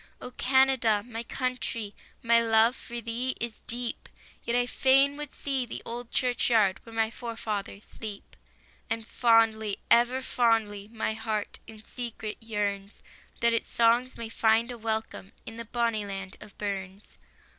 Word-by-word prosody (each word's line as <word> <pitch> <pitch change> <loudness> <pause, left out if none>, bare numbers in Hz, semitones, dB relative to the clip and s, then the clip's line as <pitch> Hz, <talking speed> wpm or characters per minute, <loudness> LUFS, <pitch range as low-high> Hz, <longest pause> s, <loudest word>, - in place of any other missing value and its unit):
Oh, 250 - -7
Canada, 260 -6 +3
my 230 -1 -5
country, 235 -4 -3 0.3
My 230 0 +5
love 225 +1 +4
for 240 -1 -7
thee 235 +3 -2
is 235 -1 -4
deep, 240 0 -3 0.3
Yet 235 - -1
I 245 0 +3
fain 270 +3 +4
would 295 -1 -7
see 270 -2 -2
the 240 - -7
old 235 0 -5
church 250 -2 +1
yard 210 -5 +3
Where 230 -1 -12
my 225 0 +1
forefathers 220 -4 -5
sleep. 210 -3 -9 0.5
And 225 -1 -2
fondly, 225 -3 +3
ever 245 +2 +5
fondly, 220 -5 +1
My 220 -1 -1
heart 220 -1 -3
in 220 -1 -11
secret 230 -3 -6
yearns, 205 -2 -2 0.5
That 235 0 +4
its 230 - 0
songs 235 +2 +3
may 230 -1 -5
find 225 +1 +2
a 240 - -6
welcome 220 -3 -3
In 225 - -8
the 230 - -6
bonnie 230 -2 -1
land 195 -1 -6
of 205 - -13
Burns. 195 -1 -4
230 Hz, 155 wpm, -28 LUFS, 215-240 Hz, 0.5 s, My